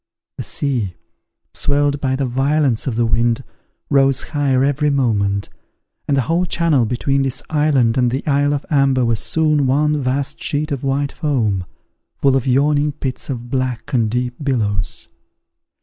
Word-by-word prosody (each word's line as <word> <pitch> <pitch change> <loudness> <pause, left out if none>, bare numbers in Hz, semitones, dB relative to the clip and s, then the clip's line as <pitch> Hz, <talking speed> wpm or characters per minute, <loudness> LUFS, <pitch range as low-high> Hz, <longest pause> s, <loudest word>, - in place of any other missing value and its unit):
The - - -4
sea, 120 -11 -2 0.6
swelled 145 0 +1
by 130 -1 0
the 135 0 -1
violence 135 0 +1
of 125 - -1
the 120 0 +2
wind, 115 +1 +1 0.4
rose 135 -1 +3
higher 140 -4 +1
every 145 +2 +1
moment; 105 -8 0 0.6
and 140 - +2
the - - +3
whole 170 +7 0
channel 155 -10 +2
between 135 +4 0
this 135 -2 -1
island 140 -6 +2
and 125 -1 +3
the 130 +4 -3
isle 145 0 +2
of 140 - -5
Amber 135 -3 +3
was 115 -2 +1
soon 150 -2 +2
one 150 +2 +2
vast 135 +2 -2
sheet 150 +1 -1
of 140 -2 -3
white 140 +1 0
foam, 110 - -1 0.5
full 135 -1 +3
of 135 -1 0
yawning 145 +3 +2
pits 135 -2 -5
of 120 -2 -5
black 130 -2 -2
and 115 -4 +2
deep 125 +2 -1
billows. 105 -8 -1
135 Hz, 160 wpm, -19 LUFS, 120-145 Hz, 0.6 s, rose